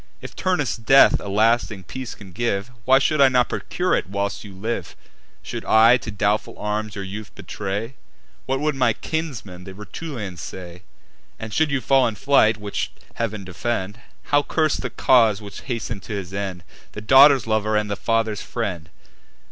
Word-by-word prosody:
If - - -10
Turnus' 180 -10 0
death 135 +4 +6
a - - -8
lasting 110 -1 +1
peace 130 +6 -7
can 100 -3 -13
give, 110 0 -2
Why 130 +1 +6
should 145 +2 +2
I 135 - +7
not 125 -1 +2
procure 180 +1 -2
it - - 0
whilst 100 0 -3
you 105 - -10
live? 110 +5 -4 0.5
Should - - -6
I 115 +3 +6
to 120 - -8
doubtful 105 0 -1
arms 105 0 -3
your 100 - -5
youth 100 +2 -7
betray, 105 +5 -5 0.5
What 135 0 0
would 150 0 +1
my 125 -4 +2
kinsmen, 120 - -5
the 95 0 -10
Rutulians, 105 - -7
say? 90 -1 -9 0.6
And, 110 -1 -7
should 155 -1 +2
you 140 -2 0
fall 135 -1 +4
in 110 - -3
fight, 110 -4 +3
(which 105 -1 -4 0.2
Heav'n 110 -3 -3
defend!) 95 +3 -3 0.2
How 145 0 +2
curse 155 +1 +1
the 125 - -4
cause 115 -3 +4
which 100 -2 -9
hasten'd 115 -4 -4
to 110 - -7
his 95 -2 -5
end 95 -3 -4 0.3
The 105 - -7
daughter's 135 +4 +7
lover 110 -1 +1
and 105 0 0
the 100 - -2
father's 110 -1 0
friend? 90 -9 -4
110 Hz, 175 wpm, -22 LUFS, 100-130 Hz, 0.6 s, I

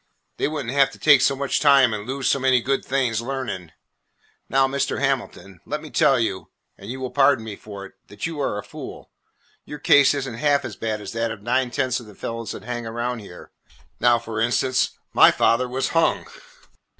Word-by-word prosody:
They - - 0
would 150 -3 -4
n't 115 - -3
have 140 -1 +4
to - - -12
take 145 -4 +5
so 140 - +3
much 140 0 -1
time 140 -5 +5
and 105 0 -5
lose 135 0 -2
so 140 - +2
many 130 -1 +3
good 135 +3 -1
things 125 -4 0
learning. 115 -10 -5 0.8
Now, 135 +1 +3
Mr. 140 +1 -2
Hamilton, 125 -8 -3
let - - -4
me - - -11
tell - - +3
you, - - -2 0.3
and 100 - -12
you 130 +2 -5
will 130 -1 -4
pardon 135 -4 +3
me 105 -2 -6
for 100 -1 -10
it, - - -14
that 100 - -6
you 160 -3 -4
are 105 - -1
a 105 - -5
fool. - - -10 0.5
Your 150 - -8
case 145 -1 +5
is 135 -1 -3
n't 115 -2 -7
half 145 +1 +2
as - - -6
bad 110 -2 -3
as 100 - -7
that 115 0 -1
of 110 -3 -8
nine 125 +2 +1
tenths 130 -1 -1
of 120 - -13
the 105 - -14
fellows 115 -1 -5
that - - -9
hang 120 0 -5
around 120 +1 -3
here. 95 -4 -12 0.5
Now, 120 -1 +4
for 115 -1 -5
instance, 125 +2 +1 0.2
my - - +8
father 125 +2 +2
was 130 +2 -1
hung." 165 -1 +1
125 Hz, 215 wpm, -23 LUFS, 115-135 Hz, 0.8 s, my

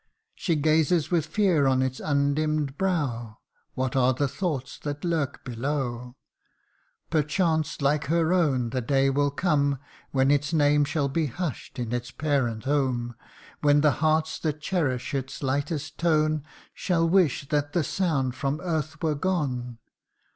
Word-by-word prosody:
She 170 - -1
gazes 155 +2 +2
with 165 -3 +1
fear 165 -5 +2
on 130 -1 +3
its 130 0 -2
undimm'd 145 0 0
brow 135 - -1 0.4
What 130 0 -1
are 130 -1 +3
the 140 +2 +1
thoughts 145 -4 -3
that 145 +2 -5
lurk 160 -5 -1
below? 125 -1 -3 1.0
Perchance, 155 -1 0
like 145 +2 +2
her 165 +3 +2
own, 135 -10 +1
the 130 - -1
day 135 +2 +2
will 145 +1 +2
come 145 -2 +1 0.3
When 135 0 +2
its 145 +2 +1
name 145 -1 +4
shall 145 -1 0
be 155 +3 0
hush'd 155 -1 -5
in 120 -2 -3
its 120 +1 -3
parent 135 -7 -1
home; 130 -4 0 0.5
When 145 -1 +4
the 150 -1 +5
hearts 155 0 +1
that 155 -2 -2
cherish 150 -8 -1
its 135 +1 -4
lightest 145 +3 -2
tone, 155 -3 +2 0.3
Shall 165 -3 +1
wish 165 -6 +2
that 145 -1 0
the 170 - +2
sound 145 -8 0
from 140 +3 -2
earth 160 -3 -3
were 155 -2 +2
gone. 140 -8 -2
145 Hz, 145 wpm, -26 LUFS, 135-160 Hz, 1.0 s, the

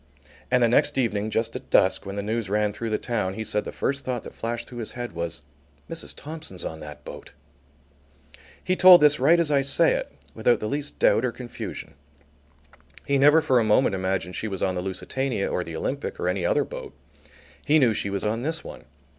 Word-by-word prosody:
And 125 -1 +3
the - - +5
next 120 - +2
evening 110 -4 0
just 110 +1 -1
at - - -8
dusk, - - +3
when 100 - -5
the 100 - -3
news 110 -1 -2
ran 105 0 +1
through 115 +2 -4
the 110 - 0
town, 105 -6 -2
he 110 - -4
said 105 -1 -1
the - - -5
first 140 0 -2
thought 125 -2 -3
that - - -10
flashed 120 +1 -4
through 120 - -9
his 110 - -5
head 120 0 -5
was: 85 -2 -5 0.4
"Mrs. 165 0 -6
Thompson's 155 - -8
on 80 - -5
that 75 -1 -10
boat." - - -10 1.3
He 185 - 0
told 185 -1 +9
this 150 0 +5
right 160 +6 +5
as 165 -3 +1
I 140 -1 +4
say 140 - +4
it - - -3 0.2
without 120 -3 +2
the - - -4
least 145 +6 -4
doubt 110 - +3
or 125 - 0
confusion. 120 -3 -8 1.1
He 140 -1 +1
never 150 +3 +6
for 130 -5 +3
a - - +2
moment 110 +1 +3
imagined 95 -1 -2
she 110 - -3
was 95 -3 -4
on 95 - +1
the 90 - -3
Lusitania 100 +5 -2
or 90 - -1
the 85 -1 -8
Olympic 140 - -4
or - - -1
any 90 -1 0
other - - +2
boat. - - -8 0.7
He 155 - +4
knew 125 -7 +4
she 100 - -2
was 100 0 -3
on 110 +2 -1
this 160 +4 -2
one. - - -10
115 Hz, 215 wpm, -25 LUFS, 100-140 Hz, 1.3 s, told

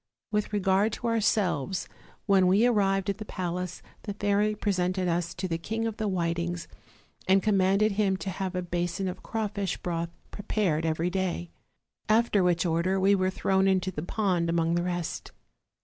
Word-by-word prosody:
With 210 0 0
regard 200 +1 +2
to - - -6
ourselves, 205 - +1 0.4
when 195 -3 +4
we 200 +6 +4
arrived 195 -5 +2
at 200 - -8
the - - -4
palace 180 -3 -4 0.2
the 205 -2 -5
fairy 205 +1 +1
presented 185 -2 0
us 170 0 -1
to 185 +2 -3
the 165 -2 -2
King 225 +6 -3
of 225 -1 -3
the 215 - -1
Whitings, 170 -2 -1 0.6
and 190 +1 +4
commanded 200 +1 +3
him 195 -1 +1
to 190 +2 -4
have 190 0 -4
a 180 - -1
basin 175 +2 -2
of 185 - -5
crawfish 205 -3 -2
broth 170 -1 -3 0.2
prepared 185 -6 0
every 160 +2 0
day. 175 - -2 0.6
After 220 -2 +4
which 175 -1 +2
order 175 +3 +1
we 195 +2 +4
were 185 -1 +2
thrown 190 0 +1
into 190 -1 +1
the 150 - -5
pond 180 -2 0
among 165 0 +1
the 175 - +1
rest. 175 -1 -4
190 Hz, 170 wpm, -28 LUFS, 175-205 Hz, 0.6 s, when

